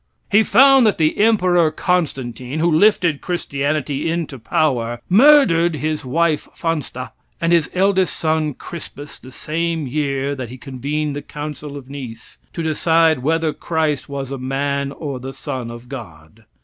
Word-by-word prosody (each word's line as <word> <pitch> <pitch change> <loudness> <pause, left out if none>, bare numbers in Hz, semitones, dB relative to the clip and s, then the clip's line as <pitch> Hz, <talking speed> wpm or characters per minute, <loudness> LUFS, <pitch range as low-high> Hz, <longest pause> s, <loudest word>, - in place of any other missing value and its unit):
He 205 +2 +6
found 265 +3 +6
that 210 - +1
the 155 -1 +2
Emperor 185 -6 +4
Constantine, 135 - -2
who 170 +1 +2
lifted 170 -3 +3
christianity 145 -3 -2
into 160 -5 -3
power, 120 -2 0
murdered 190 - +5
his 155 0 -2
wife 155 +4 0
Fansta 150 -6 -3 0.3
and 170 +1 +1
his 165 -3 +3
eldest 190 -1 +2
son 155 -3 0
Crispus 145 -3 -9
the 130 - -13
same 165 +2 -2
year 140 0 -1
that 130 -4 -6
he 130 - -9
convened 140 +3 -3
the 145 - -4
council 150 -1 -7
of 135 -2 -11
Nice 130 -5 -9
to 165 - -4
decide 160 -1 +3
whether 160 +3 0
Christ 155 -4 -2
was 140 -1 -5
a 135 - -4
man 140 +1 -2
or 140 -3 -5
the 135 +1 -7
son 125 -3 -5
of 120 +1 -10
God. 105 - -11
150 Hz, 150 wpm, -19 LUFS, 135-165 Hz, 0.3 s, He